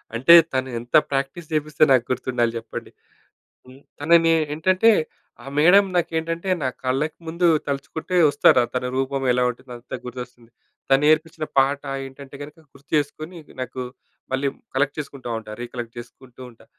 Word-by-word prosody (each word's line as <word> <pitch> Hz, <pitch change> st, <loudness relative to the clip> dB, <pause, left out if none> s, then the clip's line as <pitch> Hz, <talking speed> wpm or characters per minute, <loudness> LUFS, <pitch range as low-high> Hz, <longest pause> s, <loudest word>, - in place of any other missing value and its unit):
అంటే, 130 Hz, +8 st, +6 dB, 0.2 s
తను 130 Hz, 0 st, -1 dB
ఎంత 120 Hz, +1 st, -5 dB, 0.2 s
ప్రాక్టీస్ 140 Hz, +5 st, -3 dB
చేపిస్తే, 150 Hz, 0 st, +1 dB
నాకు 125 Hz, -2 st, +4 dB
గుర్తుండాలి 125 Hz, -2 st, -1 dB
జెప్పండి! 115 Hz, 0 st, -8 dB, 0.8 s
హ్మ్. 130 Hz, +2 st, -15 dB, 0.2 s
తనని 165 Hz, +2 st, +4 dB, 0.2 s
ఏంటంటే, 185 Hz, +8 st, +3 dB, 0.5 s
ఆ -, -, -13 dB
మేడం 180 Hz, +7 st, +6 dB
నాకేంటంటే 165 Hz, +1 st, -1 dB
నా 130 Hz, -, +1 dB, 0.2 s
కళ్ళకి 135 Hz, +5 st, -1 dB
ముందు 170 Hz, +2 st, +1 dB, 0.2 s
తలుచుకుంటే 140 Hz, +5 st, -4 dB
వస్తారు. 145 Hz, -3 st, +5 dB
తన 125 Hz, 0 st, -1 dB
రూపం 135 Hz, 0 st, -1 dB
ఎలా 125 Hz, 0 st, +2 dB
ఉంటుందో, 125 Hz, +1 st, -13 dB
అంతా 125 Hz, +1 st, -7 dB
గుర్తొస్తుంది. 125 Hz, -1 st, -9 dB, 0.4 s
తను 135 Hz, +1 st, +4 dB
నేర్పించిన 155 Hz, 0 st, +2 dB
పాట 140 Hz, +1 st, +3 dB, 0.2 s
ఏంటంటే 135 Hz, +1 st, -11 dB
గనక 150 Hz, +2 st, -12 dB
గుర్తు 140 Hz, 0 st, -21 dB
చేసుకొని, 155 Hz, +4 st, -4 dB, 0.2 s
నాకు 130 Hz, 0 st, -5 dB, 0.5 s
మళ్ళీ 135 Hz, +2 st, 0 dB, 0.3 s
కలెక్ట్ 140 Hz, +2 st, 0 dB
చేసుకుంట 140 Hz, -3 st, -8 dB
ఉంటా. 105 Hz, -1 st, -11 dB
రీకలెక్ట్ 120 Hz, -1 st, -7 dB
జేసుకుంటూ 125 Hz, +1 st, -14 dB
ఉంటా. 115 Hz, -, -21 dB
140 Hz, 145 wpm, -22 LUFS, 125-155 Hz, 0.8 s, అంటే